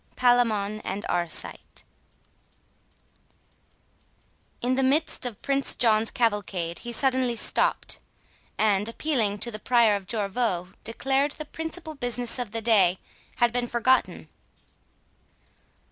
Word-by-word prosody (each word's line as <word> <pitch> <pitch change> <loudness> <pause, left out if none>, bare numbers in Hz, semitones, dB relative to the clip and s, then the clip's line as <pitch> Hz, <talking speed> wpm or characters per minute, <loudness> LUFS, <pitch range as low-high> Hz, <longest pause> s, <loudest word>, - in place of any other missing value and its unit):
PALAMON 225 -4 +2
AND 200 +3 -5
ARCITE 175 -1 -1 2.8
In 245 +1 0
the 265 - +1
midst 275 0 +1
of 225 -5 -8
Prince 275 0 +3
John's 225 -2 +2
cavalcade, 200 -7 -1
he 240 - -6
suddenly 255 -1 +1
stopt, - - +1 0.6
and 210 0 +1
appealing 230 -6 -1
to 235 +3 0
the 215 - -6
Prior 235 -3 +3
of 195 -2 -6
Jorvaulx, 200 -4 -2
declared 270 +5 0
the 305 - -7
principal 320 +1 -6
business 245 -2 -2
of 245 -3 -3
the 225 +1 -5
day 195 -6 +4 0.4
had 240 0 +2
been 245 0 -1
forgotten. 250 +2 +1
235 Hz, 115 wpm, -26 LUFS, 205-255 Hz, 2.8 s, day